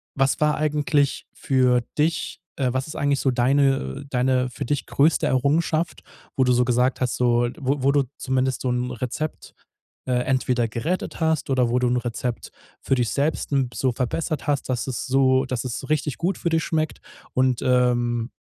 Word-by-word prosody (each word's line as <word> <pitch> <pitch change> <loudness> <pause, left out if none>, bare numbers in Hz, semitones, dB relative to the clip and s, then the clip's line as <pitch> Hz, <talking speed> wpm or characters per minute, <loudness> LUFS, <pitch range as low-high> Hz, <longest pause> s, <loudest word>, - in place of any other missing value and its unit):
was 135 0 +1
war 150 0 +3
eigentlich 150 -1 0
für 125 -2 +2 0.2
dich 160 +2 0 0.2
äh, 130 -3 +1
was 130 +2 -2
ist 155 - -8
eigentlich 140 -1 +1
so 135 - +1
deine 130 - +1
deine 125 -1 +1
für 125 - -6
dich 145 +3 -2
größte 155 +3 +2
Errungenschaft, 155 +5 +1 0.3
wo 130 - +3
du 125 -1 +3
so 125 0 +3
gesagt 125 +2 +1
hast, 125 -2 0
so 120 -1 +2
wo 140 -1 -1
wo 135 - +4
du 140 -1 +2
zumindest 130 0 -1
so'n 125 -1 -1
Rezept, 135 +5 -4 0.5
äh, 130 - -1
entweder 130 -2 +1
gerettet 145 +12 -3
hast 160 -3 0
oder 130 -3 +2
wo 125 - +2
du 125 - +1
'n 125 - +1
Rezept 120 0 -4 0.3
für - - 0
dich, 120 -4 +1
selbst 145 +2 -1
'n 135 -3 +2
so 125 +4 0
verbessert 140 +5 -2
hast, 145 -2 -1
dass 125 -2 -1
es 130 -3 -4
so 130 0 +3
dass 130 -2 -3
es 125 -3 -4
so 135 - -8
richtig 150 -2 -1
gut 180 +2 0
für 170 - -1
dich 165 -1 +1
schmeckt 155 -1 -2 0.3
und, 130 -1 +2
ähm, 120 -2 +1
130 Hz, 185 wpm, -23 LUFS, 125-145 Hz, 0.5 s, wo